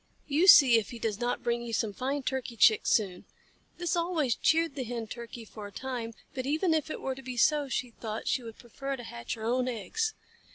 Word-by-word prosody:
You 310 +6 +2
see 255 -10 +9
if 210 - -6
he 240 - -7
does 220 -2 -2
not 245 0 -1
bring 235 0 0
you 235 -1 -6
some 220 -2 0
fine 270 +6 -2
Turkey 255 -3 -3
Chicks 215 +1 +5
soon." 190 -5 +1 0.5
This 350 -1 -1
always 335 -7 +1
cheered 320 +2 +2
the 270 -2 -3
Hen 235 -1 -4
Turkey 235 +1 -8
for 210 -1 -9
a - - -12
time, 235 -1 -5 0.2
but 255 0 -4
even 320 +4 +2
if 315 -1 0
it - - -5
were 265 - -2
to 265 - -10
be 255 -2 -7
so, 290 +3 +3
she 250 -1 -2
thought, 220 -1 -6
she - - +1
would 225 -2 -10
prefer 270 +3 -5
to 245 - -9
hatch 120 - -6
her 220 - -9
own 250 +2 +1
eggs. 435 - -2
245 Hz, 230 wpm, -29 LUFS, 230-280 Hz, 0.5 s, see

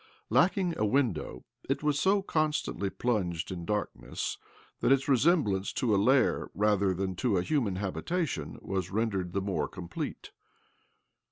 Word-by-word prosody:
Lacking 180 -1 +3
a - - +2
window, 110 - 0 0.2
it 135 - 0
was 150 -1 +2
so 195 +1 +3
constantly 155 - 0
plunged 95 -9 -1
in 85 -2 -5
darkness 105 +3 -3 0.4
that - - +2
its 135 0 +3
resemblance 130 - +3
to 115 -4 +1
a - - +4
lair 125 +6 +3
rather 100 -1 +2
than 95 0 -2
to 115 -4 +1
a 90 - +1
human 115 -7 0
habitation 150 - -2
was 95 -2 -2
rendered 100 -4 -1
the 100 - 0
more 95 0 -1
complete. 90 -3 -6
105 Hz, 145 wpm, -30 LUFS, 95-145 Hz, 0.4 s, a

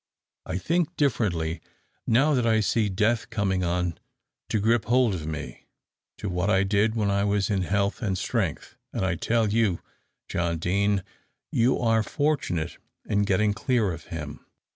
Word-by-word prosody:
I 90 - -2
think 170 - 0
differently 90 - 0 0.5
now 135 +7 +4
that 125 -4 +2
I 110 -1 +4
see 110 0 +1
death 110 +4 +1
coming 95 -3 0
on 90 -1 -1 0.5
to 110 - +1
gripe 115 +2 +2
hold 120 -2 +3
of 80 -4 -4
me, 75 -6 -6 0.5
to - - -5
what 90 +1 -1
I 95 -2 +4
did 105 +3 +2
when 105 -3 +1
I 100 0 +1
was 100 -1 +1
in 100 -2 +1
health 100 +4 0
and 95 -5 -1
strength, - - -2 0.2
and 95 - -1
I 95 - +1
tell 110 +5 +1
you, 105 -4 +2 0.5
John 85 -1 -1
Deane, 100 +3 +1 0.5
you 120 +3 +3
are 115 -2 +2
fortunate 105 - -1 0.3
in 100 -1 +1
getting 105 +1 +2
clear 115 -3 +1
of 80 - -9
him. 75 -4 -7
100 Hz, 165 wpm, -26 LUFS, 90-115 Hz, 0.5 s, now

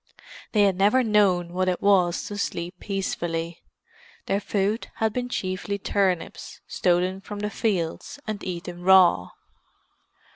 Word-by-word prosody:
They 210 -2 +5
had 195 -2 +2
never 210 +7 +4
known 190 -6 +2
what 185 0 +1
it 180 - -1
was 185 -4 +3
to 205 - -6
sleep 175 -2 -3
peacefully; 170 -4 -3 0.6
their 195 - 0
food 205 +2 -1
had 220 -1 0
been 250 0 -3
chiefly 185 -1 -3
turnips, 190 -3 -1
stolen 185 +1 0
from 205 +1 -7
the 210 0 -2
fields, 185 -4 -2
and 215 -2 -4
eaten 175 -1 -6
raw. 180 - +5
190 Hz, 135 wpm, -25 LUFS, 175-205 Hz, 0.6 s, They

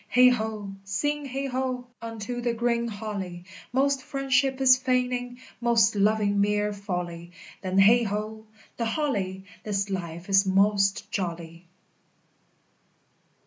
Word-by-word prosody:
Heigh 250 0 +7
ho! 220 -4 -2
sing 290 +10 -2
heigh 275 +1 -3
ho! 255 -1 -2 0.2
unto 230 +1 -5
the 240 -1 -1
green 235 0 0
holly: 200 -5 -5 0.3
Most 275 +2 +2
friendship 270 0 0
is 260 -1 +7
feigning, 250 -1 -1 0.2
most 235 -4 +3
loving 205 0 +2
mere 210 0 +1
folly: 175 -4 -5 0.3
Then, 185 0 -2
heigh 225 +5 +6
ho, 215 +1 -4 0.3
the 230 - -1
holly! 205 -8 -2 0.2
This 200 -1 -2
life 170 -2 -5
is 195 -1 +5
most 195 +1 +2
jolly! 170 -2 -5
215 Hz, 120 wpm, -26 LUFS, 195-250 Hz, 0.3 s, Heigh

